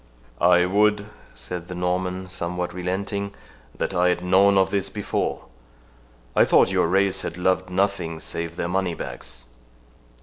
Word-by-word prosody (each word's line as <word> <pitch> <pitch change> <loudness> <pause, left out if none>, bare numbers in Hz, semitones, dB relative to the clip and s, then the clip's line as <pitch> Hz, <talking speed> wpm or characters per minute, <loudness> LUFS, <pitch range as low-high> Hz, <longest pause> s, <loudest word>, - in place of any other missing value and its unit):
"I 90 0 +5
would," 105 +2 +2 0.3
said 85 +9 -6
the 90 - -6
Norman, 90 +1 -2
somewhat 90 0 -3
relenting, 100 +3 -3 0.4
"that - - -2
I 90 0 +3
had 90 0 -1
known 95 +2 +4
of 95 -1 +3
this 100 -1 0
before. 105 +1 -3 0.9
I - - +6
thought - - +4
your - - +2
race 95 +2 +2
had 85 - -5
loved 95 0 +1
nothing 90 -4 -1
save 85 +1 -5
their 85 - -2
moneybags." 90 -8 -4
90 Hz, 140 wpm, -24 LUFS, 90-100 Hz, 0.9 s, I